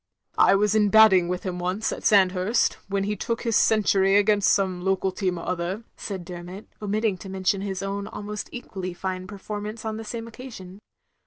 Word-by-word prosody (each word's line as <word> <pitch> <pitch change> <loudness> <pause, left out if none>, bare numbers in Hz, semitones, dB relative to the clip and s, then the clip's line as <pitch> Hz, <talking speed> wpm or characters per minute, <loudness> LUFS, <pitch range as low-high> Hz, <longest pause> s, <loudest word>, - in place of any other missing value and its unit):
"I 195 - +6
was 210 +1 +2
in, 210 -1 +3
batting, 200 -5 +6
with 180 0 -3
him 180 -2 -4
once, 185 +5 -1
at - - -6
Sand 195 -3 +5
hurst, 190 +6 +1
when 195 0 -1
he 210 +1 -1
took 230 +3 -3
his 230 -3 0
century 195 -3 +4
against 205 -1 +4
some 190 -3 +1
local 190 0 +1
team 185 -2 -2
or 170 - -7
other, 180 +4 -2
" - - -46
said 190 -4 -6
Dermot, 180 +3 -8 0.2
omitting 210 -1 0
to 195 - -9
mention 190 +1 0
his 195 -1 -4
own 200 +1 -3
almost 210 0 -6
equally 185 -7 -6
fine 185 0 -4
performance 210 +2 -6
on 220 0 -3
the 225 - -6
same 230 +1 -6
occasion. 220 -6 -10
195 Hz, 195 wpm, -25 LUFS, 185-210 Hz, 0.2 s, I